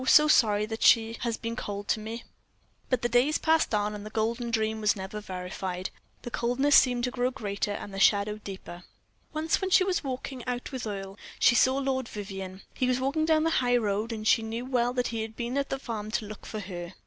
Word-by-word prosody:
so 300 Hz, +2 st, +7 dB
sorry, 210 Hz, -7 st, +4 dB
that 220 Hz, +1 st, -6 dB
she 225 Hz, 0 st, +5 dB
has 230 Hz, -2 st, -2 dB
been 230 Hz, 0 st, -4 dB
cold 205 Hz, -3 st, -5 dB
to 220 Hz, -, +1 dB
me." 225 Hz, +2 st, -6 dB, 0.7 s
But 255 Hz, -3 st, 0 dB
the -, -, +3 dB
days 245 Hz, +6 st, +3 dB
passed 320 Hz, -8 st, +2 dB
on, 210 Hz, 0 st, 0 dB
and 205 Hz, -1 st, -7 dB
that 215 Hz, -, -9 dB
golden 230 Hz, +2 st, -1 dB
dream 220 Hz, -1 st, 0 dB
was 210 Hz, +1 st, +3 dB
never 195 Hz, +2 st, -6 dB
verified; 185 Hz, -1 st, -5 dB, 0.3 s
the 240 Hz, -, -6 dB
coldness 255 Hz, +5 st, +2 dB
seemed 245 Hz, -2 st, +5 dB
to 250 Hz, -, 0 dB
grow 250 Hz, 0 st, 0 dB
greater, 205 Hz, -4 st, -3 dB
and 200 Hz, 0 st, -7 dB
the 195 Hz, -, -4 dB
shadow 205 Hz, +1 st, +3 dB
deeper. 190 Hz, -4 st, -8 dB, 0.5 s
Once, 315 Hz, +4 st, 0 dB
when 380 Hz, -, -1 dB
she 370 Hz, -, +6 dB
was 370 Hz, -3 st, 0 dB
walking 260 Hz, -1 st, -5 dB
out 245 Hz, 0 st, -3 dB
with 255 Hz, -4 st, -4 dB
Earle, 195 Hz, -1 st, -6 dB, 0.2 s
she -, -, +5 dB
saw 260 Hz, +3 st, +4 dB
Lord 265 Hz, -2 st, -1 dB
Vivianne. 195 Hz, -2 st, -7 dB
He 255 Hz, -, 0 dB
was 255 Hz, 0 st, +1 dB
walking 280 Hz, +4 st, 0 dB
down 315 Hz, -1 st, +3 dB
the 325 Hz, -, +2 dB
high 245 Hz, -1 st, +3 dB
road, 215 Hz, 0 st, -1 dB
and 215 Hz, -1 st, -5 dB
she 225 Hz, -, +5 dB
knew 225 Hz, +2 st, -4 dB
well 245 Hz, -2 st, +1 dB
that 250 Hz, -1 st, 0 dB
he 230 Hz, -1 st, -3 dB
had 220 Hz, 0 st, -6 dB
been 240 Hz, +2 st, -3 dB
at 280 Hz, 0 st, 0 dB
the 270 Hz, -, -1 dB
farm 220 Hz, -5 st, -5 dB
to 215 Hz, -, 0 dB
look 210 Hz, -1 st, -9 dB
for 215 Hz, -, -5 dB
her. 180 Hz, -2 st, -7 dB
230 Hz, 230 wpm, -28 LUFS, 205-255 Hz, 0.7 s, so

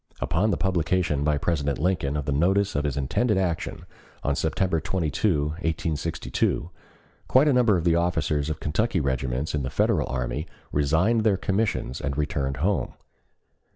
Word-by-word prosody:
Upon 100 Hz, +7 st, +1 dB
the -, -, +1 dB
publication 90 Hz, -5 st, 0 dB
by 75 Hz, 0 st, +2 dB
President 70 Hz, -3 st, -1 dB
Lincoln 75 Hz, -4 st, 0 dB
of 75 Hz, -, -3 dB
the 70 Hz, -, -1 dB
notice 95 Hz, +7 st, +2 dB
of 70 Hz, +1 st, 0 dB
his 70 Hz, -2 st, -1 dB
intended 95 Hz, -, +1 dB
action 90 Hz, -3 st, -2 dB, 0.4 s
on 70 Hz, -, +1 dB
September 80 Hz, +2 st, 0 dB
22, 80 Hz, -3 st, 0 dB
1862, 80 Hz, 0 st, -2 dB, 0.6 s
quite 135 Hz, +4 st, +5 dB
a 145 Hz, -, +4 dB
number 120 Hz, -6 st, +4 dB
of 85 Hz, -, -2 dB
the 85 Hz, -1 st, +3 dB
officers 80 Hz, -4 st, 0 dB
of 80 Hz, 0 st, -3 dB
Kentucky 95 Hz, +6 st, 0 dB
regiments 65 Hz, 0 st, -1 dB
in 75 Hz, -, 0 dB
the 65 Hz, -, -3 dB
Federal -, -, +1 dB
army 65 Hz, +4 st, -3 dB, 0.2 s
resigned 80 Hz, +11 st, +2 dB
their 105 Hz, -3 st, +3 dB
commissions 95 Hz, -, -1 dB
and 70 Hz, -1 st, -3 dB
returned 70 Hz, -3 st, -1 dB
home. 100 Hz, 0 st, 0 dB
80 Hz, 155 wpm, -25 LUFS, 70-95 Hz, 0.6 s, quite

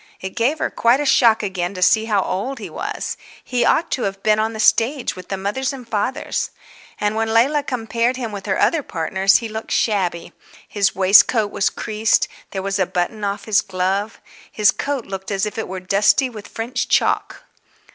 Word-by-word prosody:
It 190 Hz, -, -6 dB
gave 260 Hz, +7 st, +1 dB
her -, -, -2 dB
quite 235 Hz, +3 st, +3 dB
a 295 Hz, -, -1 dB
shock 235 Hz, -5 st, +4 dB
again 190 Hz, -1 st, -3 dB
to 185 Hz, -, -6 dB
see 220 Hz, +4 st, +4 dB
how 205 Hz, -4 st, +1 dB
old 255 Hz, +9 st, -3 dB
he 215 Hz, -, -8 dB
was; -, -, -4 dB, 0.3 s
he 250 Hz, -1 st, 0 dB
ought 335 Hz, -, +2 dB
to 255 Hz, -, -1 dB
have 195 Hz, 0 st, -4 dB
been 215 Hz, 0 st, +3 dB
on 220 Hz, +1 st, 0 dB
the 220 Hz, -, -7 dB
stage 240 Hz, +5 st, +2 dB
with 185 Hz, -1 st, -10 dB
the 195 Hz, -, -3 dB
fathers 230 Hz, +8 st, -2 dB
and 255 Hz, -3 st, -10 dB
mothers. 220 Hz, +5 st, -2 dB, 0.5 s
And 210 Hz, +1 st, 0 dB
when 220 Hz, 0 st, -1 dB
Leila 265 Hz, +7 st, +3 dB
compared 240 Hz, -2 st, -1 dB
him 235 Hz, -4 st, -4 dB
with 200 Hz, -1 st, -7 dB
her 190 Hz, -, 0 dB
other 330 Hz, -, +2 dB
partners 190 Hz, -, +1 dB
he 230 Hz, -, +2 dB
looked 220 Hz, 0 st, -7 dB
shabby. 185 Hz, -6 st, 0 dB, 0.3 s
His 200 Hz, -2 st, 0 dB
waistcoat 205 Hz, +3 st, +5 dB
was 195 Hz, -, +1 dB
creased, 215 Hz, 0 st, 0 dB, 0.2 s
there 190 Hz, -1 st, -5 dB
was 195 Hz, 0 st, -2 dB
a 185 Hz, -, +2 dB
button 180 Hz, +4 st, -2 dB
off 200 Hz, 0 st, -3 dB
his 215 Hz, -2 st, +3 dB
glove, 195 Hz, +3 st, -2 dB, 0.3 s
his 210 Hz, -2 st, +4 dB
coat 280 Hz, -4 st, -3 dB
looked 195 Hz, 0 st, -6 dB
as 200 Hz, 0 st, 0 dB
if 210 Hz, +1 st, -5 dB
it 220 Hz, -, -3 dB
was 185 Hz, 0 st, -6 dB
dusty 210 Hz, +7 st, +3 dB
with 210 Hz, -3 st, -10 dB
French 230 Hz, +1 st, -3 dB
chalk. -, -, 0 dB
215 Hz, 200 wpm, -20 LUFS, 195-235 Hz, 0.5 s, waistcoat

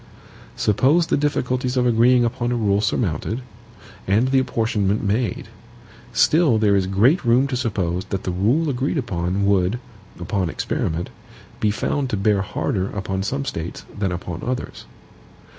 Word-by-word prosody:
Suppose 140 Hz, -, +3 dB
the -, -, +1 dB
difficulties 130 Hz, -3 st, -1 dB
of 125 Hz, -, +2 dB
agreeing 120 Hz, +1 st, +4 dB
upon 120 Hz, +1 st, -1 dB
a -, -, +1 dB
rule 105 Hz, -3 st, +1 dB
surmounted, 110 Hz, -, -1 dB, 0.6 s
and 110 Hz, +7 st, +3 dB
the 135 Hz, 0 st, +4 dB
apportionment 110 Hz, -5 st, 0 dB
made. 110 Hz, +4 st, -1 dB, 0.6 s
Still 155 Hz, -7 st, +4 dB
there 105 Hz, -2 st, +3 dB
is 95 Hz, -2 st, +1 dB
great 115 Hz, -, +3 dB
room 120 Hz, +2 st, +4 dB
to 135 Hz, -2 st, -2 dB
suppose 95 Hz, -7 st, -1 dB
that 95 Hz, -2 st, -4 dB
the 90 Hz, -, -2 dB
rule 115 Hz, -, +1 dB
agreed 135 Hz, +3 st, -1 dB
upon 95 Hz, -5 st, -1 dB
would, 100 Hz, +2 st, +2 dB, 0.4 s
upon 90 Hz, 0 st, -1 dB
experiment, 80 Hz, +1 st, -2 dB, 0.5 s
be 105 Hz, -, +2 dB
found 135 Hz, +6 st, -1 dB
to 105 Hz, -, -1 dB
bear 100 Hz, 0 st, +2 dB
harder 95 Hz, 0 st, -2 dB
upon 95 Hz, -1 st, -3 dB
some 135 Hz, +8 st, -2 dB
States 85 Hz, -, -5 dB
than 100 Hz, -3 st, -1 dB
upon 90 Hz, -1 st, -5 dB
others. 125 Hz, +1 st, -4 dB
110 Hz, 150 wpm, -22 LUFS, 95-125 Hz, 0.6 s, agreeing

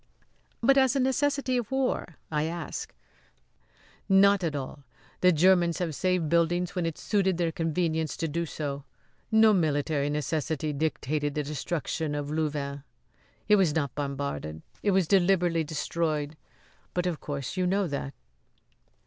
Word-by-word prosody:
"But 275 Hz, +3 st, +6 dB
as 265 Hz, 0 st, +3 dB
a -, -, +2 dB
necessity 265 Hz, 0 st, +1 dB
of 240 Hz, -4 st, -2 dB
war?" 265 Hz, -, -1 dB, 0.2 s
I 150 Hz, 0 st, +1 dB
asked. 165 Hz, 0 st, -5 dB, 1.2 s
"Not 195 Hz, 0 st, +5 dB
at 160 Hz, -3 st, -1 dB
all. 140 Hz, +1 st, -6 dB, 0.4 s
The 180 Hz, -, +5 dB
Germans 175 Hz, 0 st, +4 dB
have 175 Hz, -4 st, -2 dB
saved 180 Hz, +1 st, 0 dB
buildings 170 Hz, +2 st, +1 dB
when 180 Hz, -3 st, -1 dB
it 165 Hz, -, -4 dB
suited 190 Hz, -4 st, +1 dB
their 170 Hz, -2 st, 0 dB
convenience 160 Hz, -2 st, -1 dB
to 165 Hz, -, -1 dB
do 170 Hz, +2 st, -2 dB
so. 145 Hz, -2 st, -4 dB, 0.5 s
No 220 Hz, 0 st, +6 dB
military 145 Hz, -4 st, +1 dB
necessity 150 Hz, +1 st, -1 dB
dictated 145 Hz, 0 st, -1 dB
the 150 Hz, -, 0 dB
destruction 150 Hz, +1 st, -3 dB
of 145 Hz, 0 st, -3 dB
Louvain. 145 Hz, -2 st, -2 dB, 0.7 s
It 210 Hz, 0 st, +6 dB
was 180 Hz, -6 st, +2 dB
not 140 Hz, -5 st, -1 dB
bombarded. 140 Hz, -, -4 dB, 0.2 s
It 205 Hz, -, +1 dB
was 190 Hz, -3 st, +3 dB
deliberately 175 Hz, -3 st, +3 dB
destroyed. 155 Hz, -1 st, -2 dB, 0.6 s
But, 180 Hz, 0 st, 0 dB
of 175 Hz, -4 st, -1 dB
course, 140 Hz, -2 st, -5 dB
you 185 Hz, -1 st, +1 dB
know 195 Hz, +2 st, +1 dB
that." 140 Hz, -3 st, -4 dB
165 Hz, 145 wpm, -28 LUFS, 145-185 Hz, 1.2 s, But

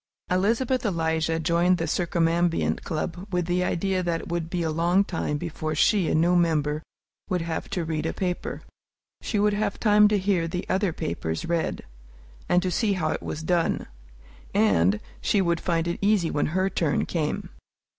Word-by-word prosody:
Elizabeth 230 Hz, +8 st, +1 dB
Eliza 160 Hz, -4 st, 0 dB
joined 170 Hz, +2 st, +2 dB
the 165 Hz, -, -1 dB
Circumambient 170 Hz, 0 st, +1 dB
Club 175 Hz, +4 st, -4 dB
with 180 Hz, -2 st, 0 dB
the 180 Hz, +1 st, +1 dB
idea 185 Hz, +1 st, 0 dB
that 170 Hz, -2 st, -1 dB
it -, -, -10 dB
would 170 Hz, -1 st, -2 dB
be 175 Hz, -1 st, -1 dB
a 160 Hz, -, 0 dB
long 170 Hz, +5 st, +3 dB
time 165 Hz, -5 st, -2 dB
before 155 Hz, -1 st, -4 dB
she, 190 Hz, +2 st, +3 dB
a -, -, +1 dB
new 170 Hz, +3 st, +3 dB
member, 155 Hz, -3 st, +1 dB, 0.5 s
would 180 Hz, -3 st, 0 dB
have 165 Hz, -1 st, -4 dB
to 180 Hz, -4 st, -2 dB
read 160 Hz, 0 st, -2 dB
a -, -, -1 dB
paper. 180 Hz, -2 st, -3 dB, 0.6 s
She 215 Hz, -, -2 dB
would 205 Hz, 0 st, +3 dB
have 205 Hz, -1 st, -1 dB
time 210 Hz, -1 st, +5 dB
to 210 Hz, 0 st, +2 dB
hear 185 Hz, -4 st, +1 dB
the 180 Hz, +2 st, -4 dB
other 190 Hz, -1 st, +1 dB
papers 80 Hz, -, -3 dB
read, 170 Hz, -1 st, -1 dB, 0.7 s
and 180 Hz, 0 st, +3 dB
to 185 Hz, -, -1 dB
see 210 Hz, +1 st, +1 dB
how 160 Hz, -5 st, -1 dB
it -, -, -3 dB
was 155 Hz, -, -5 dB
done; 170 Hz, 0 st, +1 dB, 0.7 s
and 100 Hz, -2 st, +3 dB, 0.2 s
she 205 Hz, -, +2 dB
would 170 Hz, -3 st, +1 dB
find 170 Hz, -2 st, 0 dB
it 170 Hz, -, -2 dB
easy 200 Hz, -4 st, +2 dB
when 145 Hz, -, 0 dB
her 185 Hz, +4 st, +1 dB
turn 165 Hz, -6 st, 0 dB
came. 155 Hz, -4 st, -2 dB
170 Hz, 180 wpm, -25 LUFS, 160-185 Hz, 0.7 s, time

